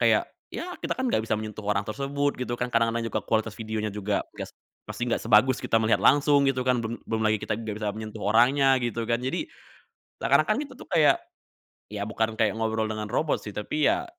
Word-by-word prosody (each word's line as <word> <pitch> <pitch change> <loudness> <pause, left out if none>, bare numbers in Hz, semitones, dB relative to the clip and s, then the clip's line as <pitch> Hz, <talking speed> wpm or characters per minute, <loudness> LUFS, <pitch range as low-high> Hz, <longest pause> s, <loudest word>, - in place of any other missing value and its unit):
kayak - - +3 0.3
ya 360 +1 -5
kita, - - -2
kan, 260 - 0
enggak 110 - +1
bisa 115 - 0
menyentuh 110 0 -6
orang 100 0 0
tersebut 140 +5 -1
gitu 125 -1 -2
kan, 125 - 0
kadang-kadang 115 0 +2
juga - - -1
kualitas 110 -1 0
videonya 110 -1 -3
juga 105 0 -1
gas - - -6 0.4
pasti - - -6
nggak - - +1
sebagus 120 +4 +4
kita 115 - +2
melihat 110 - +3
langsung 145 0 +5
gitu 130 -1 0
kan, 125 -1 +3
belum 115 +1 -4
belum 110 0 -1
lagi 110 0 +2
kita - - -1
enggak 110 -2 -5
bisa 105 - 0
menyentuh 110 -1 -7
orangnya, 130 +5 +4
gitu 115 -1 -2
kan. 115 0 +2
Jadi 130 - -2 0.7
seakan-akan 215 +8 +3
kita 285 - -12
tuh - - -12
kayak, 160 -4 +5 0.8
ya 105 - -4
bukan 110 0 -1
kayak 110 - +3
ngobrol 110 0 0
dengan 110 -1 -3
robot 150 +4 0
sih 105 - -7
tapi, 145 +8 -1
ya, - - 0
115 Hz, 205 wpm, -26 LUFS, 110-135 Hz, 0.8 s, langsung